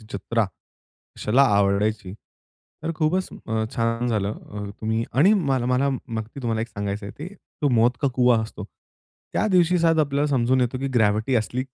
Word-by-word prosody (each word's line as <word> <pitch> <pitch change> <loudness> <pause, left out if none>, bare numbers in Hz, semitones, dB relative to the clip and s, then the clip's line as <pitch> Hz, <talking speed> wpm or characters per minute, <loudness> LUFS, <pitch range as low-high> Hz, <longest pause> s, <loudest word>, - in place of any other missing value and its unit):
जत्रा 115 +3 0 0.7
कशाला 125 +6 +3
आवडायची. 100 0 +1 0.7
तर 165 +1 -2
खूपच, 170 +4 0 0.2
अ, 110 0 -1
छान 115 +1 0
झालं, 105 -3 0
अ, 105 -1 -8 0.2
तुम्ही 110 +1 -1
आणि 160 - +5
मला 135 - 0
मला 125 +2 +2
मग 115 -4 -4
मी 135 - -7
तुम्हाला 115 -2 -1
एक 115 - -3
सांगायचंय 100 0 -4
ते, 155 - -6 0.4
तो 145 - +4
मौत 115 +2 +5
का 140 - +2
कुवा 125 -2 +4
असतो. 110 -2 -7 0.7
त्या - - +1
दिवशी 180 0 +4
शायद 165 -1 +3
आपल्याला 145 0 +1
समजून 130 0 +2
येतो 125 +1 0
की 135 +1 -2
ग्रॅव्हिटी 110 +2 +2
असली 120 +4 -1
120 Hz, 170 wpm, -23 LUFS, 110-140 Hz, 0.7 s, आणि